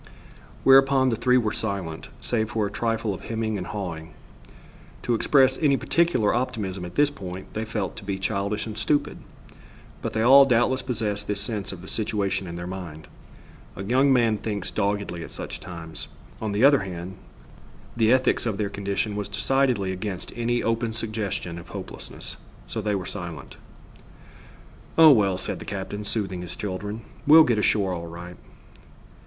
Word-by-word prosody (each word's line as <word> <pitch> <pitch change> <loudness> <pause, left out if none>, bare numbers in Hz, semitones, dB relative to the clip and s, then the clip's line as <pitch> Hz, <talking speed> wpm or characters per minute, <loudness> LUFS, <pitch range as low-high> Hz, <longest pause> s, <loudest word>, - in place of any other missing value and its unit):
Whereupon 135 0 +6
the 115 - +1
three 125 +3 +3
were 110 -4 +1
silent, 100 -8 -3
save 110 -3 0
for 110 -2 0
a 100 - -4
trifle 115 -1 -1
of 95 - -9
hemming 110 -1 -2
and 90 - -5
hawing. 85 -6 -5 0.9
To 120 - +1
express 130 +3 +4
any 140 -4 +3
particular 165 -12 +2
optimism 100 -7 -2
at 90 - -9
this 145 0 +4
time 95 -5 -7
they 110 +1 -3
felt 110 -3 -3
to - - -8
be 100 -1 -3
childish 100 +1 -1
and 110 -2 -6
stupid, 145 +7 0 0.8
but - - -3
they 110 - +1
all 135 +3 +9
doubtless 130 0 +2
possessed 105 -5 -2
this 105 -1 0
sense 100 -1 -3
of 95 -2 -9
the - - -10
situation 100 -3 -1
in 85 - -6
their 85 0 -5
mind. 90 -4 -7 0.7
A 95 - -5
young 130 +7 +3
man 115 -4 +3
thinks 105 -4 -3
doggedly 100 -4 -1
at - - -10
such - - -6
times. 80 -2 -8 0.3
On 110 -1 -2
the 105 +4 +1
other 140 0 +7
hand, 90 0 -6 0.8
the 115 -1 +3
ethics 130 -1 +3
of 105 -3 -1
their 105 -2 -1
condition 100 +1 -2
was 105 -1 -3
decidedly 110 -1 +1
against 95 0 -5
any 120 0 0
open 115 0 0
suggestion 105 -6 -3
of 85 - -12
hopelessness. - - -6 0.3
So 110 - -4
they 105 0 0
were 95 -2 -3
silent. 85 -7 -7 1.4
"Oh, 160 -1 +10
well," 100 -7 +3
said - - -4
the - - -7
captain, 105 +1 -5
soothing 95 -5 -2
his 90 - -7
children, 105 +2 -4 0.3
"We'll 160 +2 +10
get 120 -6 +2
ashore 100 -3 +2
all 85 -1 -5
right." 85 +1 -9
105 Hz, 170 wpm, -25 LUFS, 95-120 Hz, 1.4 s, Oh